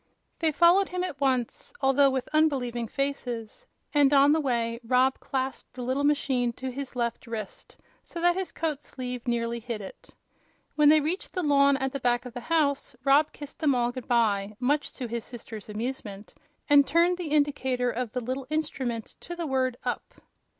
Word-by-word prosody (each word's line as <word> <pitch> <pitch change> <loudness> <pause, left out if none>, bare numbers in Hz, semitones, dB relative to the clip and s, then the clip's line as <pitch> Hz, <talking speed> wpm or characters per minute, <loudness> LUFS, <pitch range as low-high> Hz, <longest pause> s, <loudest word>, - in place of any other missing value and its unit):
They 320 -1 +2
followed 345 +5 +5
him 365 0 -2
at 285 -6 -5
once, 255 -4 0
although 270 +1 +4
with 260 -1 -2
unbelieving 255 -7 +1
faces, 275 - -4 0.3
and 290 -2 +5
on 280 0 +6
the 315 +1 +3
way 235 -4 -1
Rob 255 +3 +2
clasped 265 0 -4
the 250 - -5
little 260 +3 0
machine 265 -4 +1
to 260 +2 -5
his 270 0 -6
left 235 0 -2
wrist, 220 -3 -7 0.3
so 340 - -8
that 350 +1 +3
his 380 -1 -3
coat 305 -3 -2
sleeve 250 -3 -6
nearly 235 0 -1
hid 230 -1 -4
it. 195 - -10 0.6
When 300 -1 +5
they 310 0 +6
reached 330 +6 -3
the 365 - -1
lawn 280 -2 +4
at 265 0 -1
the 275 - -4
back 245 0 +1
of 250 - -8
the 245 - -5
house 285 -1 0
Rob 285 +3 +4
kissed 290 -1 -10
them 290 -4 +3
all 240 0 +1
good 255 -1 -8
by, 210 -4 +1
much 285 +4 0
to 255 - -5
his 235 0 -4
sisters' 225 -4 -9
amusement, 210 -2 -5 0.3
and 285 -1 +6
turned 345 +3 +3
the 350 - -3
indicator 265 -4 +1
of 245 -2 -3
the 250 - -3
little 255 +2 -4
instrument 265 -7 -3
to 345 - -7
the 340 -1 -4
word 260 -3 0
"up." - - -4
265 Hz, 185 wpm, -27 LUFS, 240-290 Hz, 0.6 s, on